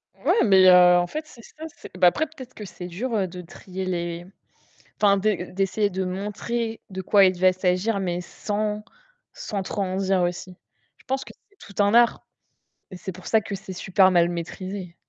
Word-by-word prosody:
Ouais, -, -, +2 dB
mais 190 Hz, -3 st, +6 dB
heu, 180 Hz, -1 st, +8 dB
en 175 Hz, 0 st, +1 dB
fait, 310 Hz, -, -5 dB
c'est 235 Hz, -, -15 dB
ça 315 Hz, +7 st, -11 dB, 0.3 s
bah, 180 Hz, -1 st, +6 dB
après, 310 Hz, -, +2 dB
peut-être 270 Hz, -5 st, -12 dB
que 210 Hz, -, -9 dB
c'est 180 Hz, -1 st, -8 dB
dur 200 Hz, +2 st, -2 dB
de 180 Hz, +1 st, -8 dB
trier 185 Hz, +2 st, -8 dB
les 175 Hz, -1 st, -3 dB, 0.8 s
enfin, 200 Hz, -1 st, +5 dB
d'essayer 195 Hz, 0 st, 0 dB
de 190 Hz, 0 st, -2 dB
montrer 210 Hz, +5 st, -3 dB
de 190 Hz, 0 st, -5 dB
quoi 200 Hz, +1 st, +5 dB
il 185 Hz, -1 st, +2 dB
va 185 Hz, 0 st, +5 dB
s'agir, 185 Hz, +3 st, 0 dB
mais 180 Hz, -2 st, -2 dB
sans, 210 Hz, +3 st, -3 dB, 0.5 s
sans 200 Hz, -3 st, -4 dB
trop 200 Hz, +2 st, -3 dB
en 185 Hz, -1 st, -2 dB
dire 190 Hz, -1 st, +1 dB
aussi. 175 Hz, +1 st, -3 dB, 0.4 s
Je -, -, -24 dB
pense 265 Hz, +1 st, -2 dB
que -, -, -12 dB, 0.2 s
c'est 405 Hz, -, -30 dB, 0.2 s
tout -, -, +2 dB
un 205 Hz, +2 st, +2 dB
art 235 Hz, 0 st, +4 dB, 0.6 s
et 185 Hz, -, -9 dB
c'est 190 Hz, -, -6 dB
pour 185 Hz, 0 st, -12 dB
ça 220 Hz, -, +4 dB
que 205 Hz, -, -7 dB
c'est 190 Hz, 0 st, -8 dB
super 190 Hz, +1 st, +3 dB
mal 175 Hz, -1 st, +4 dB
maîtrisé. 180 Hz, +1 st, -6 dB
190 Hz, 190 wpm, -24 LUFS, 180-210 Hz, 0.8 s, heu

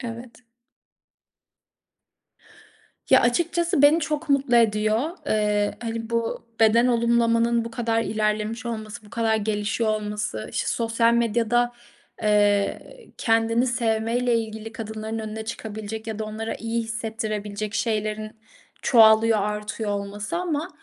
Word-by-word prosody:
Evet. 235 Hz, 0 st, -8 dB, 2.7 s
Ya, -, -, +7 dB
açıkçası 340 Hz, +4 st, +1 dB
beni 300 Hz, +3 st, +6 dB
çok 310 Hz, 0 st, -3 dB
mutlu 275 Hz, -3 st, +3 dB
ediyor. 220 Hz, +4 st, +2 dB, 0.2 s
Eee, 210 Hz, -1 st, +1 dB
hani 230 Hz, -1 st, -4 dB
bu 230 Hz, -1 st, -2 dB, 0.2 s
beden 225 Hz, +2 st, +5 dB
olumlamanın 235 Hz, -1 st, +2 dB
bu 230 Hz, -, -6 dB
kadar 230 Hz, -1 st, 0 dB
ilerlemiş 215 Hz, +2 st, -1 dB
olması, 220 Hz, -1 st, -6 dB
bu -, -, -17 dB
kadar 225 Hz, -1 st, +1 dB
gelişiyor 215 Hz, +1 st, -1 dB
olması, 210 Hz, -, -4 dB
işte, -, -, -1 dB
sosyal 230 Hz, 0 st, +2 dB
medyada, 235 Hz, +1 st, +1 dB, 0.5 s
eee, 205 Hz, -1 st, +3 dB, 0.4 s
kendini 230 Hz, +2 st, +2 dB
sevmeyle 235 Hz, 0 st, +1 dB
ilgili 220 Hz, 0 st, -6 dB
kadınların 220 Hz, 0 st, -5 dB
önüne 220 Hz, 0 st, -5 dB
çıkabilecek 220 Hz, 0 st, -6 dB
ya 220 Hz, -2 st, -4 dB
da 220 Hz, -, -2 dB
onlara 220 Hz, +1 st, -4 dB
iyi 230 Hz, +1 st, -2 dB
hissettirebilecek 215 Hz, -2 st, -4 dB
şeylerin 215 Hz, -1 st, -1 dB, 0.5 s
çoğalıyor, 225 Hz, -2 st, +6 dB
artıyor 210 Hz, +1 st, -3 dB
olması 205 Hz, +6 st, -4 dB
ama 335 Hz, -2 st, -2 dB
225 Hz, 115 wpm, -24 LUFS, 215-235 Hz, 2.7 s, Ya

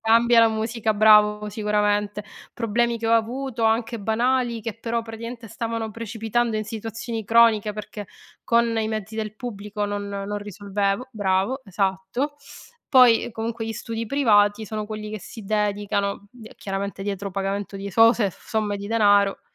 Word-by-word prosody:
Cambia 230 Hz, +1 st, +5 dB
la 230 Hz, -, +6 dB
musica, 220 Hz, 0 st, -1 dB
bravo, 210 Hz, 0 st, +5 dB
sicuramente. 210 Hz, 0 st, 0 dB, 0.3 s
Problemi 235 Hz, +1 st, 0 dB
che 225 Hz, -, -3 dB
ho 225 Hz, -, +2 dB
avuto, 235 Hz, +1 st, 0 dB
anche 225 Hz, +1 st, +1 dB
banali, 235 Hz, +2 st, 0 dB
che 225 Hz, -, -3 dB
però 230 Hz, 0 st, -2 dB
praticamente 230 Hz, +1 st, -8 dB
stavano 225 Hz, 0 st, -3 dB
precipitando 225 Hz, +1 st, -2 dB
in 215 Hz, -, -2 dB
situazioni 225 Hz, +1 st, -5 dB
croniche 225 Hz, -1 st, +4 dB
perché 210 Hz, -1 st, -7 dB, 0.4 s
con 235 Hz, -1 st, +2 dB
i 220 Hz, -1 st, 0 dB
mezzi 220 Hz, 0 st, -4 dB
del 215 Hz, -1 st, -4 dB
pubblico 210 Hz, -3 st, -5 dB
non 205 Hz, 0 st, -3 dB
non 200 Hz, +1 st, -4 dB
risolvevo. 205 Hz, +3 st, -2 dB
Bravo, 200 Hz, +5 st, 0 dB
esatto. 195 Hz, +8 st, -2 dB, 0.5 s
Poi, 250 Hz, -4 st, +6 dB
ehm, -, -, -6 dB
comunque 225 Hz, 0 st, -4 dB
gli 225 Hz, -, -3 dB
studi 230 Hz, 0 st, -5 dB
privati 215 Hz, -5 st, +3 dB
sono 215 Hz, 0 st, -4 dB
quelli 215 Hz, 0 st, -6 dB
che 215 Hz, -1 st, -6 dB
si 220 Hz, +4 st, -10 dB
dedicano, 205 Hz, -1 st, -1 dB
d 230 Hz, -3 st, -13 dB
chiaramente 195 Hz, 0 st, -4 dB
dietro 200 Hz, 0 st, -4 dB
pagamento 195 Hz, +1 st, -3 dB
di 195 Hz, +1 st, -6 dB
esose 225 Hz, 0 st, +4 dB
somme 210 Hz, +1 st, -3 dB
di 200 Hz, -, -6 dB
denaro, 205 Hz, -3 st, +3 dB
220 Hz, 155 wpm, -23 LUFS, 205-230 Hz, 0.5 s, la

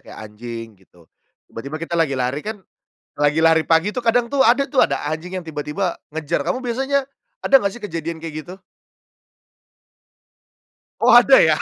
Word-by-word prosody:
kayak -, -, -12 dB
anjing 115 Hz, +1 st, -9 dB
gitu, 90 Hz, -3 st, -24 dB, 0.4 s
tiba-tiba 140 Hz, +7 st, -7 dB
kita 165 Hz, +1 st, -3 dB
lagi 165 Hz, -4 st, +1 dB
lari 130 Hz, +2 st, -2 dB
kan, 215 Hz, -1 st, -5 dB, 0.6 s
lagi 145 Hz, +2 st, +2 dB
lari 160 Hz, -1 st, +4 dB
pagi 165 Hz, +5 st, +3 dB
tuh 250 Hz, -, -3 dB
kadang 235 Hz, 0 st, +1 dB
tuh 280 Hz, -, -1 dB
ada 250 Hz, +4 st, +4 dB
tuh, 275 Hz, -1 st, -1 dB
ada -, -, -3 dB
anjing 170 Hz, +4 st, -5 dB
yang 185 Hz, -, -4 dB
tiba-tiba 155 Hz, +3 st, -4 dB, 0.2 s
ngejar 160 Hz, -2 st, -1 dB
kamu 255 Hz, -, -2 dB
biasanya 270 Hz, +3 st, 0 dB, 0.4 s
ada 270 Hz, -, +6 dB
gak 200 Hz, -3 st, -2 dB
sih 240 Hz, -, -12 dB
kejadian 165 Hz, -3 st, -5 dB
kayak 155 Hz, -1 st, -7 dB
gitu? 185 Hz, +2 st, -11 dB, 2.4 s
Oh, -, -, +4 dB
ada -, -, +7 dB
ya? -, -, +3 dB
165 Hz, 165 wpm, -20 LUFS, 145-230 Hz, 2.4 s, ada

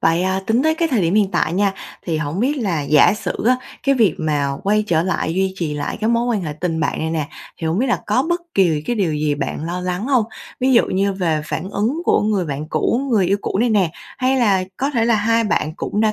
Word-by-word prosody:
Vậy, 165 Hz, +2 st, +2 dB
à, 190 Hz, +1 st, 0 dB
tính 235 Hz, +4 st, +2 dB
tới 315 Hz, 0 st, +2 dB
cái 330 Hz, 0 st, 0 dB
thời 250 Hz, -8 st, +1 dB
điểm 170 Hz, +4 st, +1 dB
hiện 205 Hz, -2 st, +3 dB
tại 160 Hz, -, 0 dB
nha, 200 Hz, +1 st, +2 dB, 0.3 s
thì 165 Hz, -2 st, 0 dB
hổng 155 Hz, +5 st, -3 dB
biết 285 Hz, +4 st, +1 dB
là, 185 Hz, -, -1 dB
giả 150 Hz, +6 st, +5 dB
sử -, -, -3 dB
á, 255 Hz, 0 st, +5 dB, 0.3 s
cái 275 Hz, -, +3 dB
việc 220 Hz, -, +3 dB
mà 145 Hz, -3 st, 0 dB
quay 210 Hz, +2 st, +2 dB
trở 165 Hz, -3 st, +2 dB
lại 175 Hz, -3 st, -1 dB
duy 190 Hz, 0 st, 0 dB
trì 155 Hz, -5 st, -2 dB
lại 145 Hz, -1 st, -3 dB
cái 220 Hz, -, +1 dB
mối 235 Hz, +1 st, +1 dB
quan 220 Hz, -6 st, 0 dB
hệ 150 Hz, -3 st, -3 dB
tình 160 Hz, +1 st, -3 dB
bạn -, -, -1 dB
này 160 Hz, 0 st, -2 dB
nè, 155 Hz, -2 st, -2 dB, 0.3 s
thì 165 Hz, -, -3 dB
hổng 165 Hz, +5 st, 0 dB
biết 260 Hz, -, +1 dB
là 240 Hz, -, 0 dB
có 255 Hz, -, +2 dB
bất 345 Hz, 0 st, 0 dB
kỳ 165 Hz, -6 st, +2 dB
cái 240 Hz, -, -1 dB
điều 180 Hz, -6 st, +1 dB
gì 150 Hz, -1 st, 0 dB
bạn 150 Hz, +1 st, -4 dB
lo 175 Hz, +2 st, -3 dB
lắng 180 Hz, +5 st, -3 dB
hông? 255 Hz, -6 st, +3 dB, 0.4 s
Ví 260 Hz, +1 st, +3 dB
dụ 235 Hz, -, +5 dB
như 195 Hz, +1 st, 0 dB
về 165 Hz, -5 st, -1 dB
phản 175 Hz, +4 st, -4 dB
ứng 240 Hz, +12 st, -1 dB
của -, -, +3 dB
người 205 Hz, -3 st, +1 dB
bạn 150 Hz, 0 st, -5 dB
cũ, 235 Hz, -, 0 dB
người 205 Hz, -6 st, +3 dB
yêu 195 Hz, +3 st, +2 dB
cũ -, -, -2 dB
này 240 Hz, +2 st, +2 dB
nè, 195 Hz, -6 st, +2 dB, 0.3 s
hay 260 Hz, +1 st, +2 dB
là 200 Hz, -7 st, +2 dB
có 275 Hz, +3 st, -1 dB
thể 235 Hz, -5 st, +1 dB
là 235 Hz, -1 st, +3 dB
hai 230 Hz, +2 st, +2 dB
bạn 155 Hz, -7 st, 0 dB
cũng 210 Hz, -, -2 dB
đã 215 Hz, -1 st, +3 dB
195 Hz, 270 wpm, -19 LUFS, 160-230 Hz, 0.4 s, giả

